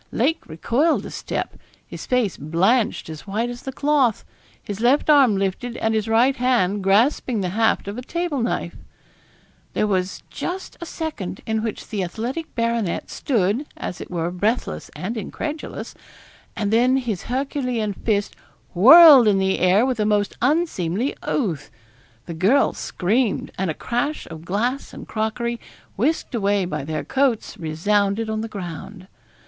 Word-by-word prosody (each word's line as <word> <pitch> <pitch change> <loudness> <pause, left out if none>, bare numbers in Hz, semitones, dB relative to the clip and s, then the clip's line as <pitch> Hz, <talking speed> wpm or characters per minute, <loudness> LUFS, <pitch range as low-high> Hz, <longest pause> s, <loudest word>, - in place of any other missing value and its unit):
Lake 295 +7 0
recoiled 240 - 0
a - - -7
step; - - -4 0.3
his - - -9
face 250 -6 +1
blanched 185 - +1
as 160 +3 -9
white 225 +5 -1
as 245 +1 -8
the 265 - -5
cloth; 275 -5 +1 0.3
his 205 -1 -7
left 270 +5 +4
arm 265 -9 +5
lifted, 195 +5 -2
and 225 0 0
his 220 0 0
right 240 +5 +3
hand 220 -6 +1
grasping 220 +3 +2
the 180 - -1
haft 220 +2 +1
of 205 +4 -5
a - - -5
table 330 0 -2
knife. 235 - -2 1.0
There - - +1
was 190 -2 -1
just 370 +2 -5
a 340 - -6
second 305 - -5
in 220 -1 -1
which 220 -1 -5
the 205 -3 -2
athletic 235 - -5
baronet 230 -6 -1
stood, 230 +3 0
as 180 - -5
it - - -8
were 175 -1 -2
breathless 210 +7 -2
and 205 +6 -4
incredulous, 300 +9 -5 0.6
and 210 0 -1
then 250 +3 +4
his 230 -8 -3
Herculean 250 -4 -2
fist 205 0 -1 0.4
whirled 275 - +9
in 205 -2 +4
the 190 0 +1
air 185 +6 +4
with 255 -3 -1
a 210 - +2
most 205 -1 +1
unseemly 255 - 0
oath: 165 - -2 0.6
the 170 - -6
girl 200 +12 +3
screamed, 215 +4 -1
and 190 -1 -2
a 155 - -2
crash 285 +6 -2
of 160 0 -9
glass 235 +9 -2
and - - -9
crockery, 230 +2 -2 0.4
whisked 285 +7 -1
away 200 -4 +1
by 150 -5 -4
their 155 +1 -3
coats, 265 -4 0
resounded 200 +7 0
on 215 0 -2
the 225 - -4
ground. 185 -1 -8
220 Hz, 155 wpm, -22 LUFS, 195-255 Hz, 1.0 s, whirled